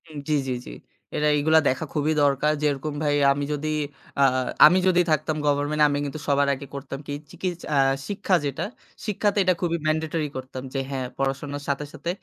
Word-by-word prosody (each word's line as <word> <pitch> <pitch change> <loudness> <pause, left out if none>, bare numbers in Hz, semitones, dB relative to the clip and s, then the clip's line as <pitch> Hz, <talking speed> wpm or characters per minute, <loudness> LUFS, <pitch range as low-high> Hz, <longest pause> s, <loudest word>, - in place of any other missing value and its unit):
উম 155 - -9
জি, - - +2 0.2
জি, - - 0
জি। - - -8 0.4
এরা 150 - +1
এইগুলা 160 +2 +4
দেখা 130 +5 0
খুবই 150 0 +1
দরকার। 140 +1 +3
যেরকম 150 0 0
ভাই 145 -1 +2 0.2
আমি 145 +1 -1
যদি 150 +1 -3 0.5
আ - - +6 0.4
আমি 175 +5 +6
যদি 180 -1 +5
থাকতাম 155 +1 +1
গভর্নমেন্ট 145 +1 +1
আমি 145 0 0
কিন্তু 145 +2 -5
সবার 140 0 +3
আগে 140 +1 -6
করতাম 135 0 -6
কি? 145 - -3 0.2
চিকিস 185 -1 -3 0.2
আ - - +3 0.3
শিক্ষা 200 -2 +1
যেটা, 140 +3 -2 0.4
শিক্ষাতে 210 0 0
এটা 185 0 +4
খুবই 170 -1 0
ম্যান্ডেটরি 155 0 0
করতাম। 130 0 -7
যে 135 - -1
হ্যাঁ 130 -2 -2
পড়াশোনার 140 +1 -2
সাথে, 140 +1 -1
সাথে 155 +2 -5
150 Hz, 185 wpm, -24 LUFS, 140-160 Hz, 0.5 s, আ